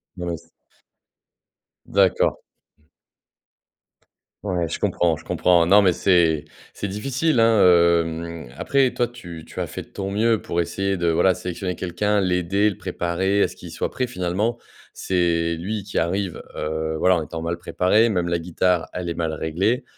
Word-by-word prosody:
Non 90 -2 -5
mais 85 - -2
s 85 - -28 1.4
D'accord. 95 -1 +2 2.0
Ouais, 90 -4 -1
je - - -4
comprends, 85 -2 +1
je - - -15
comprends. 85 -2 +3
Non 100 +4 +6
mais 95 - +4
c'est 85 -4 +2 0.3
c'est 100 - -4
difficile, 130 +7 0
hein, 115 -1 +4 0.4
hem, 85 -1 -5
après 135 - +1
toi 120 - +1
tu 90 -9 -10
tu - - -9
as - - -2
fait - - -6
de - - -14
ton 95 0 -5
mieux, 110 +2 +2
pour 85 - -1
essayer 95 +3 -1
de 85 -2 0
voilà, 90 +3 +3
sélectionner 90 0 -4
quelqu'un, 100 +4 0
l'aider, 90 +3 +1
le 100 - -7
préparer 95 +4 0
à - - +1
ce - - -13
qu'il - - -10
soit - - -3
prêt 125 - -2
finalement. 105 +1 -1 0.4
C'est 85 -2 0
lui 100 +5 -4
qui 100 - -6
arrive, 90 +2 -2
heu, 80 +1 -2
voilà, 90 +2 +3
en 80 - -2
étant 80 +2 -6
mal 85 +1 -2
préparé, 95 +5 +2
même 90 -6 0
la 85 0 0
guitare, 90 0 0
elle 90 -1 -4
est - - -2
mal 80 -1 -2
réglée. 95 - 0
90 Hz, 170 wpm, -22 LUFS, 85-100 Hz, 2.0 s, Non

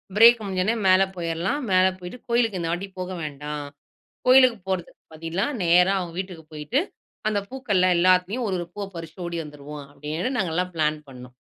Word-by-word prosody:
"Break 230 +2 +8
முடிஞ்சோன 190 +2 0
மேல 185 0 +6
போயிரலாம். 170 - -2
மேல 185 0 +5
போயிட்டு 180 +7 -8
கோயிலுக்கு 230 -5 +2
இந்த 165 -1 -2
வாட்டிப் 190 +2 -4
போக 185 0 -4
வேண்டாம். 150 0 -5 0.6
கோயிலுக்குப் 250 -6 +6
போறதுக்கு 185 -3 -4
பதிலா, 165 +4 -2 0.2
நேரா 180 +3 +5
அவங்க 170 -2 -5
வீட்டுக்குப் 175 -5 -6
போயிட்டு, 155 - -1 0.5
அந்தப் 200 -1 -2
பூக்கள்ல 205 -9 +1
எல்லாத்துலயும் 185 +7 +3
ஒரு 190 - -1
ஒரு 175 - -4
பூவ 205 -1 -3
பறிச்சுட்டு 165 +2 -8
ஓடி 170 -1 -3
வந்துருவோம்" 145 0 -9
அப்படின்னு 155 - -3
நாங்க 180 -7 -1
எல்லாம் 180 0 0
ப்ளான் 155 -1 +1
பண்ணோம். 125 -1 -12
180 Hz, 165 wpm, -24 LUFS, 160-200 Hz, 0.6 s, Break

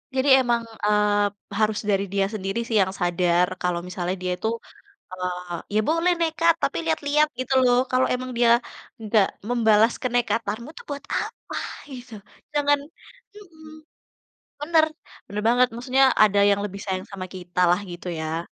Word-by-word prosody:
Jadi 265 +2 +2
emang, 240 -2 +1 0.2
eee, 210 0 +3 0.3
harus 215 -1 +1
dari 195 -1 +2
dia 195 -1 +2
sendiri 195 +2 -3
sih 225 - -2
yang 190 - +1
sadar, 175 0 +2
kalau 180 -1 0
misalnya 180 0 -3
dia 180 0 -2
itu, 220 - -3 0.6
eee, 180 -1 -4 0.2
ya - - +4
boleh 330 +3 +2
nekat, 330 0 +3
tapi - - 0
lihat-lihat 285 - +2
gitu 255 +1 -2
loh, 245 -1 +4
kalau 255 0 +3
memang 255 0 -4
dia 235 -1 +4 0.5
enggak 215 -2 +2 0.2
membalas 225 -1 +4
kenekatanmu 235 -1 -1
tuh - - -11
buat 285 -1 -5
apa, - - -6 0.4
gitu. 250 -2 -10 0.4
Jangan 290 -1 +2 0.6
mhm, 325 -6 -14 0.9
bener, 315 +1 +4 0.4
bener 205 +1 -4
banget. 245 +2 +4
Maksudnya 255 +3 +2 0.2
ada 205 -1 +3
yang 200 0 +2
lebih 200 -1 -7
sayang 190 -1 -3
sama 190 -1 -6
kitalah, 180 0 +1
gitu 175 +1 -8
ya. 160 +2 -3
215 Hz, 150 wpm, -24 LUFS, 185-255 Hz, 0.9 s, ya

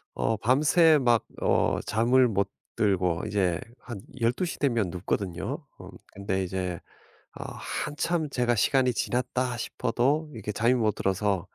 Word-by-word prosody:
어 115 - 0
밤새 150 - +4
막 120 -3 +3 0.2
어 - - +2
잠을 125 +3 +3
못 100 -3 0 0.3
들고 90 -4 +1
이제 95 -5 0 0.2
한 120 -5 -8 0.2
12 120 +9 +1
시 170 - -5
되면 115 -9 +1
눕거든요. 90 0 -3
어 - - -11 0.2
근데 95 -1 -2
이제 90 -2 -3 0.6
어 - - -6
한참 155 +2 -2
제가 120 -3 +1
시간이 125 +4 +3
지났다 125 +1 -1
싶어도 135 +6 0
이렇게 105 -1 -5
잠이 115 +4 +2
못 110 -4 +1
들어서 95 -1 0
115 Hz, 250 characters per minute, -27 LUFS, 100-130 Hz, 0.6 s, 밤새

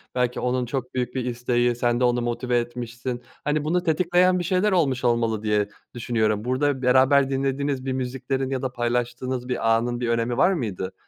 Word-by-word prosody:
belki 125 -1 0
onun 125 0 0
çok 125 +1 -4
büyük 125 0 -2
bir 130 - -1
isteği 120 0 0
sen 120 0 +1
de - - +1
onu 120 0 +2
motive 120 +1 -1
etmişsin. 120 +1 -5 0.2
Hani 150 0 0
bunu 175 +3 0
tetikleyen 180 +2 +3
bir - - -2
şeyler 185 +4 +1
olmuş 135 -8 +1
olmalı 115 -3 +1
diye 105 -1 +1 0.2
düşünüyorum 110 -3 0
burda 130 +2 0
beraber 135 +2 +4
dinlediğiniz 135 0 -1
bir 130 - -1
müziklerin 130 +1 -2
ya 130 -2 -2
da 130 -1 -2
paylaştığınız 125 +1 -2
bir 115 -3 +2
anın 120 +1 -1
bir 120 -1 -1
önemi 115 +1 0
var 190 +7 +4
mıydı? 95 - -3
125 Hz, 185 wpm, -24 LUFS, 120-135 Hz, 0.2 s, beraber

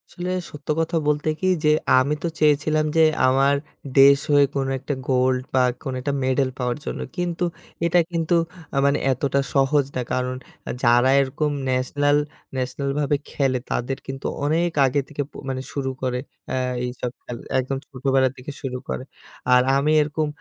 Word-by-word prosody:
আসলে, 180 0 -4 0.2
সত্য 150 -1 -12
কথা 165 +1 0
বলতে 150 +1 +1
কি? 185 - 0 0.2
যে 150 - +6 0.3
আমি 140 +3 +1
তো - - +1
চেয়েছিলাম 155 +1 +3
যে 160 - +7 0.2
আমার 135 +2 +4 0.4
দেশ 140 0 +8
হয়ে 145 0 +6
কোনো 135 -1 0
একটা 140 +2 -3 0.2
গোল্ড, 130 0 +2
বা 130 - +4 0.2
কোনো 130 - -3
একটা 140 +2 -1
মেডেল 130 +1 +1
পাওয়ার 125 -1 -1
জন্য। - - -4 0.2
কিন্তু, 175 0 -1 0.4
এটা 175 +1 +4
কিন্তু 170 0 +1 0.4
আ - - 0
মানে 140 +1 +3
এতটা 135 +2 0 0.2
সহজ 140 +1 +3
না। 130 - 0
কারণ 125 0 -1 0.5
যারা 120 +2 +5
এরকম 140 +3 -1 0.2
ন্যাশনাল 145 +3 +2 0.4
ন্যাশানালভাবে 140 +3 -1
খেলে, 135 -3 0
তাদের 130 +2 -1
কিন্তু 135 0 -6 0.2
অনেক 165 +3 +1
আগে 135 +2 +1
থেকে 145 -1 -4
প - - -54 0.2
মানে 130 -1 -2
শুরু 135 -2 -2
করে 125 -1 -1 0.3
অ্যা 130 - -1 0.3
এইসব 125 0 -4
খেল 120 - -6 0.2
একদম 130 +1 -2
ছোটোবেলা 135 -1 +1
থেকে 130 +3 -7
শুরু 130 -3 -3
করে। - - -3 0.5
আর 125 - +7 0.2
আমি 145 +2 +2
এরকম 150 +1 -1
140 Hz, 165 wpm, -23 LUFS, 130-150 Hz, 0.5 s, দেশ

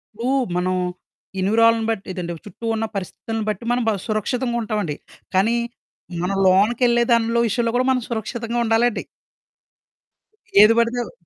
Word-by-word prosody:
ఇప్పుడు 235 +4 -2 0.3
మనం 185 +1 0 0.6
ఎన్విరాలను 225 +3 +3
బట్టి 210 -3 -3
ఇదంటే 175 -2 -4
చుట్టూ 230 - -10
ఉన్న 225 0 -1
పరిస్థితులను 220 +4 -4
బట్టి 210 +2 -3
మనం 245 0 +1
బా - - +2
సురక్షితంగుంటామండి. 215 - -1 0.4
కానీ 210 +5 +3 0.7
మనం 195 +2 -1
లోనకెళ్ళే 235 +5 +3
దానిలో 230 0 +3
విషయంలో 230 +1 0
కూడా 255 +1 +2
మనం 255 -1 +1
సురక్షితంగా 235 +1 -3
ఉండాలండి. 230 +1 +2 1.6
ఏది 215 +2 +7
పడితే 235 +1 +1
అవ్ - - -11
225 Hz, 130 wpm, -21 LUFS, 205-235 Hz, 1.6 s, ఏది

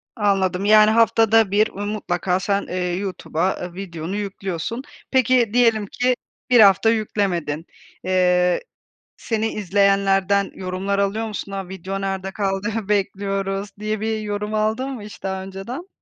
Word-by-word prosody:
Anladım 195 -3 +1
yani 215 0 +7
haftada 225 -2 +4
1 215 +2 +3
mutlaka 195 -3 -2
sen, 200 +1 0
eee, 180 -1 -2
YouTube'a, 185 -2 -2
eee, 180 -1 -6
videonu 175 -1 -5
yüklüyorsun. 200 +2 -4 0.3
Peki 255 -3 +3
diyelim 230 -3 +3
ki 250 +5 0 0.3
1 245 -1 +6
hafta 200 +1 +6
yüklemedin, 185 -8 -1 0.4
eee, 180 -1 +2 0.6
seni 225 -1 -1
izleyenlerden 200 0 +2
yorumlar 190 +2 -2
alıyor 200 +3 0
musun? 205 -1 -6
"A! 195 -2 -5
Video 190 +1 -5
nerde 195 -1 -3
kaldı? 195 +1 -1 0.2
Bekliyoruz." 195 -1 -1
diye 215 0 -2
bir 220 0 -1
yorum 210 0 -3
aldın 220 +5 0
mı 255 -5 -6
hiç 210 0 -11
daha 190 0 -3
önceden? 195 - -7
200 Hz, 135 wpm, -22 LUFS, 190-215 Hz, 0.6 s, yani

